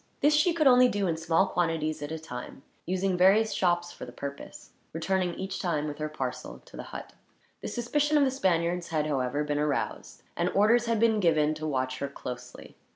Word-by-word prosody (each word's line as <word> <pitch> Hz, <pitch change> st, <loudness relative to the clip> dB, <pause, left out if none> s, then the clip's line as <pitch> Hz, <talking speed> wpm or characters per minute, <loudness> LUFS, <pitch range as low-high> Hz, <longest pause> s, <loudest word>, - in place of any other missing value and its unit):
This 295 Hz, +1 st, +4 dB
she 305 Hz, +4 st, +4 dB
could 330 Hz, -2 st, 0 dB
only 250 Hz, -1 st, +7 dB
do 205 Hz, -4 st, -1 dB
in 170 Hz, -3 st, 0 dB
small 165 Hz, +3 st, +2 dB
quantities 160 Hz, -4 st, -1 dB
at 145 Hz, +1 st, -5 dB
a 160 Hz, -, -3 dB
time, 135 Hz, -4 st, -9 dB, 0.2 s
using 185 Hz, +1 st, 0 dB
various 195 Hz, +5 st, +4 dB
shops 175 Hz, -1 st, +1 dB
for -, -, -10 dB
the -, -, -8 dB
purpose; 140 Hz, 0 st, -8 dB, 0.2 s
returning 175 Hz, +2 st, -1 dB
each 190 Hz, 0 st, -5 dB
time, 155 Hz, -5 st, -1 dB
with 145 Hz, 0 st, -6 dB
her 155 Hz, 0 st, -2 dB
parcel, 130 Hz, -4 st, -5 dB
to -, -, -15 dB
the -, -, -6 dB
hut. -, -, -8 dB, 0.5 s
The -, -, -5 dB
suspicion 295 Hz, +5 st, 0 dB
of 290 Hz, -, +5 dB
the 265 Hz, -, +2 dB
Spaniards 175 Hz, -7 st, 0 dB
had, 155 Hz, -2 st, -1 dB
however, 140 Hz, -1 st, -1 dB
been 145 Hz, 0 st, -1 dB
aroused; 150 Hz, -1 st, -3 dB
and 175 Hz, +1 st, 0 dB
orders 230 Hz, +4 st, +4 dB
had 230 Hz, -2 st, +1 dB
been 225 Hz, -1 st, +3 dB
given 155 Hz, -5 st, +3 dB
to 155 Hz, 0 st, -5 dB
watch 130 Hz, -2 st, -2 dB
her 140 Hz, -, -2 dB
closely. 125 Hz, -2 st, -9 dB
170 Hz, 205 wpm, -28 LUFS, 150-205 Hz, 0.5 s, only